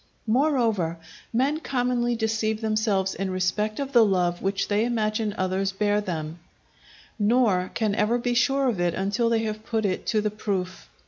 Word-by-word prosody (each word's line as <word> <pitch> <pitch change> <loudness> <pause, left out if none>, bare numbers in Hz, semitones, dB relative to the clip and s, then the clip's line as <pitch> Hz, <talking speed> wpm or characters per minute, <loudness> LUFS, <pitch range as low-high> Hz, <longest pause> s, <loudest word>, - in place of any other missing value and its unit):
Moreover 230 - +1 0.3
men 270 +6 +1
commonly 245 -4 0
deceive 220 -1 -1
themselves 215 -3 0
in 195 -1 -3
respect 185 +4 -1
of 275 -1 -3
the 240 -4 +6
love 180 -4 +1
which 195 +1 -1
they 205 +1 +1
imagine 215 -2 -1
others 190 +1 0
bear 205 +1 +1
them, 165 -4 -5 0.8
nor 205 -4 +2
can 215 -3 0
ever 210 +3 +2
be 245 0 -1
sure 270 +3 +2
of 225 -7 0
it 175 -1 +1
until 205 +5 0
they 225 -1 +1
have 215 0 -4
put 220 -1 -1
it 185 -2 -2
to 220 - +2
the 210 0 -1
proof. 190 -3 -4
215 Hz, 170 wpm, -25 LUFS, 195-235 Hz, 0.8 s, the